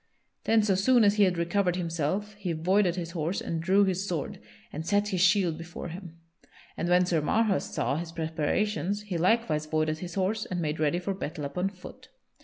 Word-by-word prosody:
Then 225 -1 +4
so 205 -2 +2
soon 235 +5 +4
as 205 0 +4
he 205 - +6
had 180 -2 0
recovered 180 +1 +1
himself 175 +4 -2
he 185 -4 -2
voided 180 +3 +2
his 170 -2 -4
horse 170 +2 -2
and 165 -1 -3
drew 190 +4 +4
his 190 0 -1
sword 165 -7 -3 0.3
and 155 - -4
set 205 +4 +1
his 185 -4 -1
shield 180 -3 +3
before 170 +1 -7
him; 170 -1 -9 0.6
and 175 - -2
when 180 0 +4
Sir 170 -3 +1
Marhaus 215 +5 +1
saw 135 +4 -1
his 165 0 -5
preparations, 175 +6 -1
he 190 -5 -3
likewise 175 -5 +1
voided 155 0 0
his 175 -1 -7
horse 200 +3 0
and 180 - -4
made 155 -2 -2
ready 155 +2 +1
for 180 +2 -2
battle 155 -5 -5
upon 180 +7 -2
foot. 185 -2 -13
180 Hz, 200 wpm, -28 LUFS, 165-200 Hz, 0.6 s, he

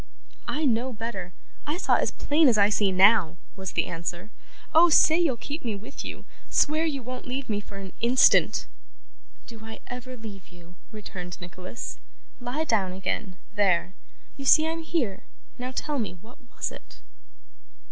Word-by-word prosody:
'I 305 +1 -1
know 250 0 +1
better. 215 -6 -5 0.4
I 300 +3 -1
saw - - +3
as - - +1
plain 300 +1 +3
as 230 - +3
I 200 0 +5
see 205 -2 +2
now,' 185 -3 +5 0.2
was 190 -2 -6
the - - +1
answer. 175 +4 -5 0.4
'Oh! 340 +2 +7
say 320 +1 +6
you'll 300 -8 +2
keep 290 +7 -6
me 225 -4 -2
with 220 +7 -8
you. - - -7 0.2
Swear 310 +2 +2
you 280 -5 -3
won't 255 +2 -7
leave 260 +2 -3
me 205 -2 -1
for 200 -1 -11
an 195 -1 -8
instant!' 255 +4 +5 0.8
'Do 225 -2 -11
I 220 0 -8
ever 250 +1 -7
leave 205 -4 -9
you?' 175 -1 -16 0.2
returned 180 -5 -7
Nicholas. 180 +4 -7 0.4
'Lie 250 +5 -2
down 200 -10 +1
again 190 0 -3 0.2
there! 190 -3 +2 0.4
You 275 - -7
see 315 +3 +6
I'm 325 0 -2
here. 305 - -1 0.4
Now, 250 +1 -3
tell 290 +2 -2
me; 215 -6 -2
what 235 +3 -16 0.2
was - - -1
it? - - -13
225 Hz, 165 wpm, -26 LUFS, 190-275 Hz, 0.8 s, Oh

